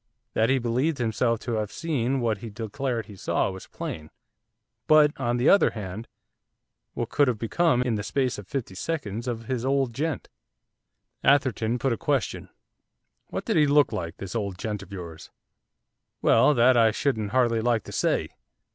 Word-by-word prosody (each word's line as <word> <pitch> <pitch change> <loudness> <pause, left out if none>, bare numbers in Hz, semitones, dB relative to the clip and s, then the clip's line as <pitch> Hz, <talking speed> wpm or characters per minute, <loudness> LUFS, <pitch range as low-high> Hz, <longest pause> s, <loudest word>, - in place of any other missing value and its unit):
That 110 +2 +2
he 135 - +4
believed 130 +6 0
himself 115 0 0
to 125 - -4
have 105 -1 -2
seen 135 -5 -1
what 110 -4 0
he 115 - -7
declared 115 +3 -3
he 105 - -12
saw 95 - 0
was 95 0 -10
plain. 80 0 -6 0.8
But, 155 -1 +6
on 120 -2 0
the 120 - +1
other 200 - +6
hand, 105 +1 -7 0.9
what - - -3
could 145 - +3
have 125 -3 +1
become 125 +3 +2
in 125 -2 0
the 105 - -1
space 130 +1 -1
of 100 - -10
fifty 130 -9 -4
seconds! 115 - -4
of 115 -2 -3
his 125 -1 -2
'old 135 -2 +1
gent'? 150 +3 -2 1.0
Atherton 130 -4 +2
put 130 0 0
a - - -3
question. - - -1 0.8
'What - - -5
did - - +1
he 150 -1 +5
look 145 0 +4
like, 85 -1 -4
this 95 -2 -7
old 100 -5 -3
gent 105 0 -4
of 100 0 -13
yours?' 85 -4 -8 0.9
'Well, 150 - +5
that 125 +1 +5
I 115 -1 +5
shouldn't 110 -3 -1
hardly 120 -1 +2
like 115 -2 +1
to - - -10
say. - - 0
120 Hz, 175 wpm, -26 LUFS, 110-135 Hz, 1.0 s, But